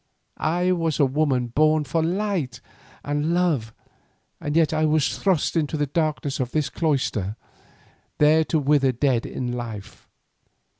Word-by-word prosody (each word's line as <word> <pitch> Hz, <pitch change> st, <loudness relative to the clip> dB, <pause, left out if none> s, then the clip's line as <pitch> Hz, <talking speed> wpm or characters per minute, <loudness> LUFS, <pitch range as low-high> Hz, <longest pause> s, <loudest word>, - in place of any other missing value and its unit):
I 175 Hz, +3 st, +1 dB
was 165 Hz, -4 st, 0 dB
a 145 Hz, -, +5 dB
woman 135 Hz, -3 st, 0 dB
born 155 Hz, +4 st, +3 dB
for 160 Hz, +4 st, -1 dB
light 175 Hz, -, -1 dB, 0.4 s
and 145 Hz, +3 st, -1 dB
love, 155 Hz, -11 st, +1 dB, 0.7 s
and 145 Hz, +1 st, -3 dB
yet 160 Hz, -2 st, +3 dB
I 155 Hz, 0 st, +1 dB
was 155 Hz, -1 st, +1 dB
thrust 185 Hz, -5 st, +1 dB
into 155 Hz, -1 st, 0 dB
the 145 Hz, -, +1 dB
darkness 145 Hz, -3 st, -2 dB
of 125 Hz, -1 st, -3 dB
this 155 Hz, -2 st, 0 dB
cloister, 125 Hz, -, -1 dB, 0.8 s
there 155 Hz, +2 st, +5 dB
to 160 Hz, -, 0 dB
wither 140 Hz, -2 st, +2 dB
dead 125 Hz, -1 st, 0 dB
in 125 Hz, -1 st, -4 dB
life. 115 Hz, -5 st, -7 dB
150 Hz, 145 wpm, -23 LUFS, 130-160 Hz, 0.8 s, a